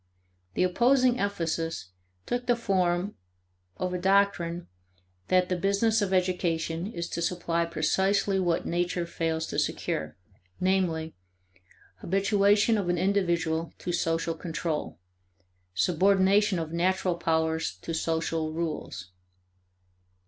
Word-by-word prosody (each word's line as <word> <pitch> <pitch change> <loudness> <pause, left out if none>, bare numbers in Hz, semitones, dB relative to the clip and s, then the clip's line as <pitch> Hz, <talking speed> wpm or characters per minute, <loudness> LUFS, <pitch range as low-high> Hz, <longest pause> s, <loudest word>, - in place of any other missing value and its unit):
The - - +2
opposing 250 +6 +3
emphasis 165 - -2 0.4
took 245 0 -2
the 245 - +4
form 185 -4 0 0.6
of 180 0 -2
a 180 - -2
doctrine 180 -3 +1 0.6
that 185 -1 +3
the 180 - 0
business 200 +4 +2
of 200 -2 0
education 180 -2 0
is 170 -5 -4
to 170 - -3
supply 170 -1 0
precisely 190 +4 +1
what 175 -2 0
nature 175 0 -1
fails 165 -1 -2
to - - -2
secure; 75 +1 -2 0.4
namely, 180 -4 0 0.8
habituation 205 - +3
of 185 -3 -2
an 175 - +1
individual 170 -4 0
to 175 - -4
social 165 0 0
control; 160 - -4 0.8
subordination 195 - +3
of 160 -1 -4
natural 180 +1 +1
powers 160 -1 0
to 165 - -4
social 160 -1 -1
rules. 155 - -4
175 Hz, 110 wpm, -28 LUFS, 165-195 Hz, 0.8 s, the